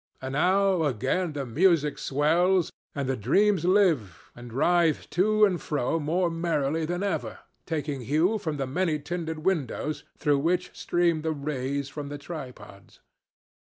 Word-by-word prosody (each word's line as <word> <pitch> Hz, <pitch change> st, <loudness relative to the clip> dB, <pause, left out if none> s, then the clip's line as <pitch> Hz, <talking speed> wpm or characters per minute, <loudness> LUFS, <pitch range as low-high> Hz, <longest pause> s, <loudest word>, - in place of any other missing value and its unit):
And 130 Hz, 0 st, -5 dB
now 185 Hz, +4 st, +3 dB
again 145 Hz, -, -1 dB
the 140 Hz, -2 st, -3 dB
music 150 Hz, +3 st, +2 dB
swells, 170 Hz, +6 st, +2 dB, 0.2 s
and 140 Hz, -2 st, -2 dB
the 135 Hz, -, 0 dB
dreams 175 Hz, -, +2 dB
live, 165 Hz, -, +1 dB
and 120 Hz, 0 st, -10 dB
writhe 165 Hz, +5 st, +2 dB
to 215 Hz, +5 st, +4 dB
and 185 Hz, -4 st, -1 dB
fro 150 Hz, +2 st, -1 dB
more 170 Hz, +4 st, 0 dB
merrily 165 Hz, -2 st, -1 dB
than 175 Hz, +3 st, -2 dB
ever, 175 Hz, -7 st, -2 dB, 0.3 s
taking 150 Hz, -4 st, -3 dB
hue 160 Hz, -, +1 dB
from 155 Hz, -5 st, -3 dB
the 135 Hz, -, -1 dB
many 155 Hz, +4 st, 0 dB
tinted 160 Hz, +1 st, -5 dB
windows 155 Hz, -4 st, -1 dB
through 145 Hz, -2 st, +2 dB
which 180 Hz, +4 st, -1 dB
stream 170 Hz, -2 st, +1 dB
the 160 Hz, 0 st, -1 dB
rays 140 Hz, -1 st, -3 dB
from 145 Hz, +1 st, -7 dB
the 145 Hz, -, -5 dB
tripods. 125 Hz, -, -10 dB
155 Hz, 150 wpm, -27 LUFS, 140-175 Hz, 0.3 s, to